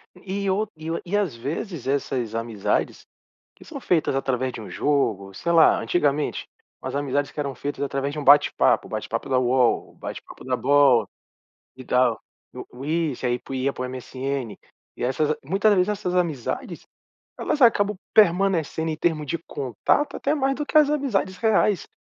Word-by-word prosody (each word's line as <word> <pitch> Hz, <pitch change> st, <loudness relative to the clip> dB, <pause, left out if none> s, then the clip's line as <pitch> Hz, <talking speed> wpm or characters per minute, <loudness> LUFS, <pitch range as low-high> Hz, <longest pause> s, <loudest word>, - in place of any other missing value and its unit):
E 200 Hz, +1 st, -4 dB
o 205 Hz, +3 st, 0 dB
e 155 Hz, +1 st, -7 dB
o 165 Hz, -, -2 dB
e 195 Hz, +4 st, 0 dB
às 190 Hz, -11 st, -1 dB
vezes 145 Hz, -, -5 dB
essas 130 Hz, -4 st, -1 dB
amizades, 115 Hz, -3 st, -2 dB, 0.5 s
que -, -, -16 dB
são -, -, -8 dB
feitas 160 Hz, -6 st, +1 dB
através 130 Hz, -1 st, -1 dB
de 115 Hz, -, -8 dB
um 105 Hz, -, -9 dB
jogo, 110 Hz, -10 st, 0 dB
sei 170 Hz, -, -2 dB
lá, 165 Hz, -1 st, +6 dB
antigamente, 150 Hz, -3 st, 0 dB, 0.3 s
umas -, -, -5 dB
amizades 145 Hz, 0 st, -1 dB
que -, -, -9 dB
eram 140 Hz, -2 st, -3 dB
feitas 145 Hz, +2 st, -4 dB
através 140 Hz, 0 st, -2 dB
de 150 Hz, -, -4 dB
um -, -, -5 dB
bate-papo. 145 Hz, +1 st, +4 dB
Bate-papo -, -, -4 dB
da 130 Hz, -, +2 dB
Uol, 125 Hz, -1 st, +1 dB
bate-papo -, -, -9 dB
da 130 Hz, 0 st, 0 dB
Bol 130 Hz, -3 st, +4 dB, 0.7 s
e 130 Hz, -, -10 dB
tal. 125 Hz, -3 st, +2 dB, 0.3 s
O -, -, -8 dB
o 135 Hz, -, -6 dB
isso, 155 Hz, -4 st, -1 dB
aí 120 Hz, 0 st, +1 dB
pro 135 Hz, -, -9 dB
ia 130 Hz, +1 st, 0 dB
para 125 Hz, -, -5 dB
o -, -, -1 dB
MSN. 130 Hz, -3 st, -5 dB, 0.4 s
E -, -, -5 dB
essas 140 Hz, +4 st, +1 dB
a 155 Hz, -, -2 dB
muitas 200 Hz, +6 st, +3 dB
de 180 Hz, -, +4 dB
dessas 200 Hz, -3 st, -2 dB
amizades, 160 Hz, -9 st, -2 dB, 0.5 s
elas 295 Hz, -, -2 dB
acabam 210 Hz, -4 st, +4 dB, 0.2 s
permanecendo 175 Hz, -5 st, +3 dB
em -, -, -2 dB
termo 155 Hz, -1 st, -1 dB
de 170 Hz, -, -2 dB
contato 140 Hz, -, -1 dB
até 285 Hz, -, 0 dB
mais 270 Hz, -2 st, 0 dB
do 295 Hz, -, -3 dB
que 310 Hz, -, +2 dB
as 300 Hz, -2 st, +6 dB
amizades 255 Hz, -11 st, -1 dB
reais, 210 Hz, -2 st, +2 dB
145 Hz, 180 wpm, -24 LUFS, 130-185 Hz, 0.7 s, lá